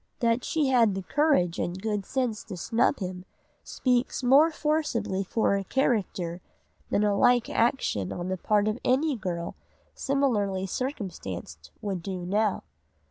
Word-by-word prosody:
That 235 -1 +1
she 305 -4 0
had 230 -6 +4
the 195 - -4
courage 275 - +2
and 175 +2 -2
good 210 -1 -2
sense 250 -5 -1
to 190 -5 -7
snub 230 +10 +1
him 180 -2 -5 0.4
speaks 250 0 0
much - - 0
more 300 +4 +7
forcibly 300 -11 -1
for 220 +4 +1
her 195 - -1
character 190 -7 -1 0.5
than 205 - +2
a 205 -1 +2
like 245 +3 +3
action 225 - +1
on 175 0 -4
the 185 0 -2
part 210 +3 +2
of 215 +3 -1
any 280 +3 +2
girl 175 -5 -4 0.4
similarly 215 -9 0
circumstanced 170 - -5
would 195 -4 -2
do 180 0 -5
now. 205 +2 0
210 Hz, 150 wpm, -27 LUFS, 185-255 Hz, 0.5 s, more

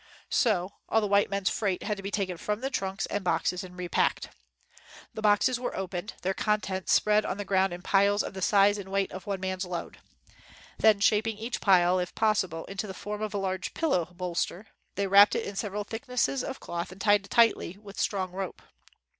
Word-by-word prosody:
So 200 -6 +2 0.2
all 225 - +4
the 215 - -1
white 200 0 +3
men's 200 -1 0
freight 195 -4 -1
had 210 - -1
to 195 - -8
be 195 - -4
taken 195 -3 -2
from 210 +8 -2
trunks 195 -3 -2
and 205 - -3
boxes 180 0 0
and 180 -1 -11
repacked. 180 -3 0 0.8
The 220 - -6
boxes 215 +4 +3
were 250 - -4
opened, 185 +1 -4
their 190 +1 0
contents 195 -3 -1
spread 210 0 +4
out - - -4
on - - -10
the 205 - -4
ground 190 -1 +2
in 175 0 -7
piles 200 +2 +3
of - - -6
the 190 - -7
size 205 +2 +4
and 190 -1 -8
weight 195 0 0
of 185 +2 -9
one 200 -1 -2
man's 185 0 -2
load. 180 -2 -6 0.8
Then 215 -2 +5
shaping 215 +1 +2
each 230 +3 -4
pile, 185 -2 +4
if 180 0 -4
possible, 190 -7 0
into 195 +2 -5
the 190 - -7
form 210 +2 -5
of 215 -1 -3
a - - +1
large 190 -2 -3
pillow 275 - +1
bolster, 180 +2 -3 0.3
they 200 - 0
wrapped 200 +1 +7
it - - -1
in 200 - -6
several 205 0 -3
thick 225 +4 -7
nesses 250 +1 0
of 265 - -5
cloth 170 +1 -5
and 185 - -12
tied 205 0 +3
it - - -16
tightly 225 -6 +3
with 205 -1 -11
strong 190 -3 -1
rope. 190 0 -6
200 Hz, 215 wpm, -28 LUFS, 185-210 Hz, 0.8 s, wrapped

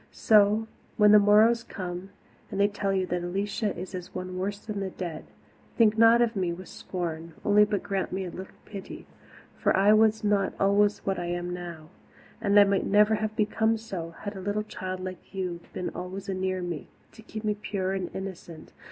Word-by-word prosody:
So, 215 0 +4 0.3
when 210 -1 +6
the 210 - +9
morrow's 215 +3 +5
come, 180 -3 -6 0.4
and - - -4
they 200 - +5
tell 200 -1 -2
you 190 -1 +1
that 180 -1 -2
Alicia 200 +3 -2
is 185 +2 -7
as 180 -1 -7
one 185 0 -5
worse 200 +2 -2
than 210 -1 -6 0.2
dead, 170 -4 -5 0.5
think 220 -2 +5
not 230 +1 +6
of 230 -1 -1
me 185 -3 0
with 180 +2 -8
scorn 165 -2 -5
only 210 0 +6
but 205 -2 -2
grant 195 -2 -2
me 190 0 -2
a 175 - -6
little 190 +2 -9
pity 200 -2 -9 0.5
for - - +1
I 200 +2 +6
was 220 0 +4
not 205 -2 +1
always 205 +1 +2
what 195 -2 0
I 175 - -3
am 175 0 -3
now, 170 -3 -8 0.5
and 200 0 +1
might 200 -1 +5
never 210 +2 +5
have 215 0 -1
become 220 +1 +1
so 180 -7 -6
had 205 0 -5
a 190 - -6
little 205 +2 -1
child 185 -3 -6
like 185 +1 -8
you 180 -3 -3
been 180 - -4
always 190 +2 -6
anear 185 -1 -2
me, 175 -4 -5 0.2
to 220 - -14
keep 215 0 -8
me 210 -1 +1
pure 200 -2 -3
and 190 -2 -3
innocent. 185 -4 -8
195 Hz, 195 wpm, -27 LUFS, 185-210 Hz, 0.5 s, the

